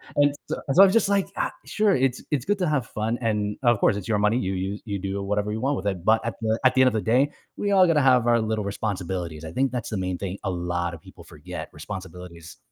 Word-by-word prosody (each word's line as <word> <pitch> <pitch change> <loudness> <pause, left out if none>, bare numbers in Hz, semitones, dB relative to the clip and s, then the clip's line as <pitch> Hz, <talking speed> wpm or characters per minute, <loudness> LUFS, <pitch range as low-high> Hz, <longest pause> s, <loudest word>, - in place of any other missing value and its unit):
and 145 0 +3
so - - -1 0.2
so 195 - +8
I - - +10
was 190 - +2
just 225 -3 +3
like, 200 -1 +2
"Ah, - - -1
sure, 210 -2 +2
it's 130 -1 0
it's 140 -3 0
good 205 - +1
to 180 - +1
have 140 -6 0
fun, 110 +2 -2
and, 105 -2 -1
of 120 -3 +4
course, 100 - +3
it's 100 - -6
your 105 -2 +1
money, 105 +3 +2
you 95 -2 -2
use 95 +2 -3
you 100 -2 -3
do 100 +1 -3
whatever 105 +1 -1
you 110 - -3
want 140 +2 +1
with 100 - -4
it, 95 -3 -3
but 110 0 +4
at 115 - -3
the 110 +1 0
at 130 - +6
the 130 - +5
end 130 - +6
of 125 - +2
the 110 - 0
day, 130 +6 +2 0.3
we 205 0 -1
all 190 -2 +6
gotta 155 -3 +3
have 125 -3 +4
our 120 -1 +4
little 110 -1 -1
responsibilities, 90 -6 -4
I 80 - -7
think 130 +5 0
that's 125 -3 -4
the 110 - -3
main 90 -1 -2
thing 100 0 -5
a 95 - -1
lot 85 -1 -2
of 80 - -10
people - - -14
forget- - - -8
responsibilities. 90 -1 -9
110 Hz, 275 wpm, -25 LUFS, 95-130 Hz, 0.3 s, I